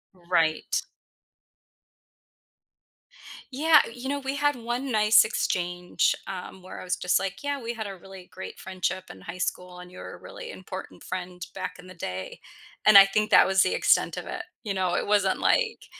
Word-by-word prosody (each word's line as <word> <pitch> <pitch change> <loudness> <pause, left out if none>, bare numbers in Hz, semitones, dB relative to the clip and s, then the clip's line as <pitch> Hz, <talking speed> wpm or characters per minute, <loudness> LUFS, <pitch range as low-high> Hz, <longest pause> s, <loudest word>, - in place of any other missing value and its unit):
Right. 170 -3 0 2.7
Yeah. 310 +1 +6
Y - - -9
you 255 +2 -5
know, 285 - 0
we 270 0 -3
had 290 -1 +2
1 245 +3 -3
nice 215 0 +6
exchange, 180 -4 0
um, 185 0 -7
where 185 - -9
I - - -8
was 180 -1 -1
just 180 0 +1
like, 195 +6 -5
"Yeah. 285 -2 -2
We 235 +1 -4
had 220 -2 -4
a 195 - -6
really 190 0 -12
great 190 - -8
friendship 185 0 -3
in 95 - -13
high 180 - -8
school, 180 0 -3
and 180 0 -11
you're 180 - -9
a - - -12
really - - -10
important - - -9
friend, 180 -1 -6
back 185 -1 -5
in 180 - -13
the 185 - -11
day." 95 - -6 0.4
And 215 -1 +8
I 195 - +11
think 210 +2 0
that - - +7
was 190 0 +3
the - - +2
extent - - +3
of - - -5
it. - - -5 0.2
You 205 -4 -2
know? 185 -2 0
It - - 0
wasn't 200 -2 +2
like, 455 -2 +1
190 Hz, 190 wpm, -26 LUFS, 180-240 Hz, 2.7 s, I